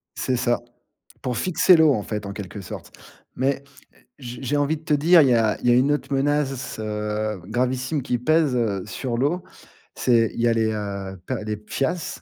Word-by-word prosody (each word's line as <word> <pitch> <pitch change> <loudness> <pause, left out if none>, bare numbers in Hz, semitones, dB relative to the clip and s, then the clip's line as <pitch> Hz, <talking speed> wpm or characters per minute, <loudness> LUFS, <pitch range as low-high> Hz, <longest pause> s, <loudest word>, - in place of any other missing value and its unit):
C'est 130 - -1
ça. 120 -1 +1 0.6
Pour 125 -2 -2
fixer 180 +1 +4
l'eau 160 -3 +5
en 105 - -2
fait, 105 -1 -4
en 100 - -5
quelque 100 0 -7
sorte. 90 - -9 0.4
Mais 135 +2 0 0.5
j 125 -3 -8
j'ai 140 +2 0
envie 145 +2 +1
de 155 - -18
te 155 - 0
dire, 165 +4 +6
il 140 - +4
y - - +5
a 115 -2 +2
il - - -1
y - - +6
a - - +6
une 130 +4 +3
autre 145 -1 -2
menace, 135 -1 0
heu, 105 -1 -3
gravissime 130 +5 -1
qui 125 -1 -1
pèse, 155 +2 +2
heu, 105 -6 0
sur 120 +2 -4
l'eau. 150 +8 0 0.5
C'est 115 -3 +3
il - - -4
y 120 - +3
a 115 - +3
les, 110 -1 +1
heu, 100 -2 -5
per 130 - -2
les 105 0 -2
PFAS, 135 - -3
125 Hz, 205 wpm, -23 LUFS, 110-145 Hz, 0.6 s, dire